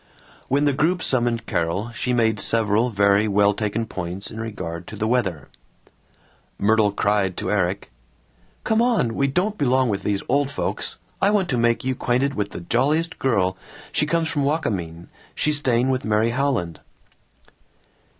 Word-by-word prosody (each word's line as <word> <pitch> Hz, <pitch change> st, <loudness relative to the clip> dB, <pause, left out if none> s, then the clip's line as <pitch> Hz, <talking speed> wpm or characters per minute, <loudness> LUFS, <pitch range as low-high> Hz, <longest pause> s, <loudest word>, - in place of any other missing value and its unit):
When 140 Hz, +2 st, +2 dB
the 145 Hz, -, +3 dB
group 170 Hz, +6 st, +1 dB
summoned 120 Hz, -3 st, +1 dB
Carol 90 Hz, +4 st, -1 dB
she 125 Hz, +2 st, -2 dB
made 110 Hz, -3 st, +2 dB
several 115 Hz, +2 st, +2 dB
very 100 Hz, 0 st, +3 dB
well 100 Hz, 0 st, +3 dB
taken 105 Hz, +2 st, -2 dB
points 95 Hz, -1 st, -6 dB
in 110 Hz, -, -7 dB
regard 90 Hz, -6 st, -6 dB
to -, -, -8 dB
the 110 Hz, +1 st, -2 dB
weather. 95 Hz, -, -1 dB, 1.1 s
Myrtle 105 Hz, 0 st, +3 dB
cried 100 Hz, -2 st, 0 dB
to -, -, -2 dB
Erik, 100 Hz, -2 st, -1 dB, 0.7 s
"Come 220 Hz, +1 st, +2 dB
on! 230 Hz, -, +2 dB
We 140 Hz, +4 st, +1 dB
don't 190 Hz, +10 st, -1 dB
belong 130 Hz, -2 st, +2 dB
with 100 Hz, -2 st, -1 dB
these 100 Hz, -1 st, -1 dB
old 140 Hz, +1 st, +1 dB
folks. 140 Hz, -, -4 dB, 0.2 s
I 195 Hz, -, +4 dB
want 200 Hz, -4 st, +1 dB
to 130 Hz, -, +1 dB
make 120 Hz, 0 st, +2 dB
you 130 Hz, 0 st, 0 dB
'quainted 130 Hz, +3 st, 0 dB
with 105 Hz, -1 st, -2 dB
the -, -, -8 dB
jolliest 145 Hz, -, 0 dB
girl, 95 Hz, -8 st, +1 dB, 0.3 s
she 150 Hz, -, +1 dB
comes 165 Hz, +1 st, +1 dB
from 145 Hz, -3 st, -1 dB
Wakamin, 90 Hz, -, -2 dB, 0.3 s
she's 150 Hz, -1 st, +1 dB
staying 125 Hz, -1 st, +1 dB
with 130 Hz, -1 st, -1 dB
Mary 110 Hz, +2 st, +1 dB
Howland." 120 Hz, -, -1 dB
115 Hz, 160 wpm, -22 LUFS, 100-140 Hz, 1.1 s, I